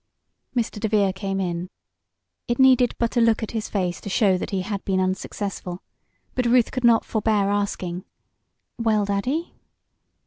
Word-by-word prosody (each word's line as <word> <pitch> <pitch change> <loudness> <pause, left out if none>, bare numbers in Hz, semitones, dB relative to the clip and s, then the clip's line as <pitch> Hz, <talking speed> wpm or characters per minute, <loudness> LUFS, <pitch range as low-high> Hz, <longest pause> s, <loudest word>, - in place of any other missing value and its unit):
Mr. 230 -3 -1
DeVere 205 -3 +2
came 195 0 -3
in. 175 -1 -2 0.8
It 240 - 0
needed 255 -2 +5
but 235 +1 -1
a - - +5
look 230 -1 +3
at 220 - -4
his 220 -2 -3
face 180 -4 -2
to - - -6
show 195 -1 +3
that 180 - -3
he 195 -2 -1
had 200 0 -4
been 190 -1 0
unsuccessful, 185 -1 -3 0.5
but 250 -1 0
Ruth 240 -1 +4
could 255 - -3
not 235 -1 +5
forbear 210 -2 +1
asking: 185 -3 -2 0.7
"Well, 215 -3 +2
Daddy?" 250 +12 -1
205 Hz, 160 wpm, -23 LUFS, 190-230 Hz, 0.8 s, needed